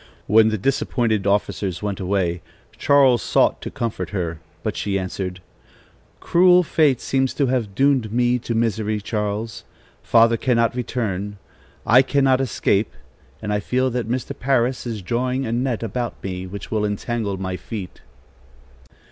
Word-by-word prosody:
When 110 +2 +5
the 110 - -1
disappointed 110 -2 0
officers 100 -2 -1
went 100 -2 -3
away, 90 -2 -1 0.3
Charles 135 -4 +4
sought - - +2
to - - -5
comfort 100 -7 -4
her; 85 -5 -3 0.2
but - - -2
she 100 -1 -1
answered: 90 -1 -4 0.8
"Cruel 180 +1 +5
fate 150 -6 +2
seems 135 -1 0
to 140 - +2
have 120 -6 -1
doomed 135 -5 +2
me 120 +1 +2
to 115 0 -4
misery, 110 -2 0
Charles. 105 +1 -3 0.4
Father 115 0 +4
cannot 115 -1 +1
return; 105 -5 -3 0.5
I 125 +3 +7
cannot 135 -1 +2
escape, 105 -4 0 0.5
and 105 -1 -1
I 105 - +1
feel 130 +5 0
that 120 -2 -3
Mr. 125 0 -2
Parris 125 -1 0
is 110 -4 -5
drawing 125 +6 -1
a 115 - -3
net 120 -1 -1
about 120 +2 -3
me, 95 -1 -4
which 100 +2 -8
will 110 -1 0
entangle 105 0 -2
my 95 -1 -3
feet." 95 +1 -7
115 Hz, 150 wpm, -22 LUFS, 100-125 Hz, 0.8 s, I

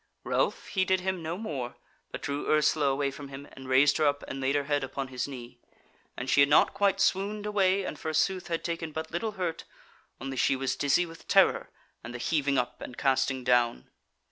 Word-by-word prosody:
Ralph - - -1
heeded 190 -1 +1
him 190 -1 -2
no 165 +2 -4
more, 140 - -5 0.3
but - - -7
drew 140 +1 -3
Ursula 150 -1 +3
away 140 0 0
from 140 +1 -9
him, 140 +1 -9
and 135 -1 -10
raised 135 +2 +5
her 155 - +3
up 145 0 0
and 135 - -5
laid 135 +2 +1
her 145 - +1
head 145 -1 0
upon 135 0 -4
his 125 0 -3
knee; 125 -4 -9 0.6
and 125 - -4
she 135 - +3
had 140 0 +6
not 150 - +5
quite 200 -1 +2
swooned 205 +2 +1
away, 195 -2 +2
and - - -5
forsooth 165 +4 0
had 165 -1 -2
taken 165 -2 -4
but 160 +1 -5
little 210 +6 -2
hurt; 180 -4 -3 0.6
only 135 +1 -5
she 135 - +3
was 135 0 -1
dizzy 145 +5 +2
with 165 -1 -13
terror - - +4 0.3
and 120 +2 -7
the - - -3
heaving 140 +1 0
up 125 0 -2
and 125 - -8
casting 130 -1 +1
down. 120 - +1
145 Hz, 205 wpm, -28 LUFS, 135-170 Hz, 0.6 s, had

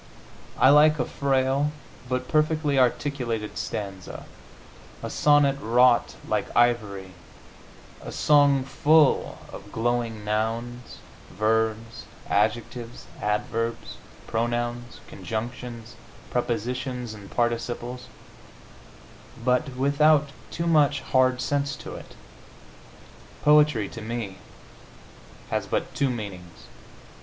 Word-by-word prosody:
I 130 - +6
like 150 +1 +6
a 125 - 0
frail 135 +2 +1 0.4
but 125 0 -2
perfectly 155 -2 +1
articulated 125 -4 -1
stanza, 95 -3 -6 0.8
a - - -4
sonnet 145 -2 +4
wrought 120 +1 +3
like - - 0
ivory, 105 -6 +1 0.9
a - - -8
song 145 -2 +4
full 150 +2 +3 0.2
of 100 +1 -10
glowing 115 -2 -1
nouns, 115 +3 -3 0.3
verbs, 110 +1 -1 0.2
adjectives, 115 +3 -1 0.2
adverbs, 115 +2 -2 0.3
pronouns, 120 +1 -2
conjunctions, 120 +1 -6 0.4
prepositions 125 0 -2
and 100 -2 -11
participles, 120 +1 -2 1.4
but 125 +2 +1
without 145 +2 +3 0.2
too 170 - -3
much 145 -4 +3
hard 130 -1 +2
sense 140 +1 -1
to - - -9
it. - - -11 1.3
Poetry, 150 -8 +4
to 115 - -9
me, 110 -4 -5 1.1
has - - -1
but - - -2
two 140 - +1
meanings. 100 -7 -7
120 Hz, 95 wpm, -25 LUFS, 110-140 Hz, 1.4 s, I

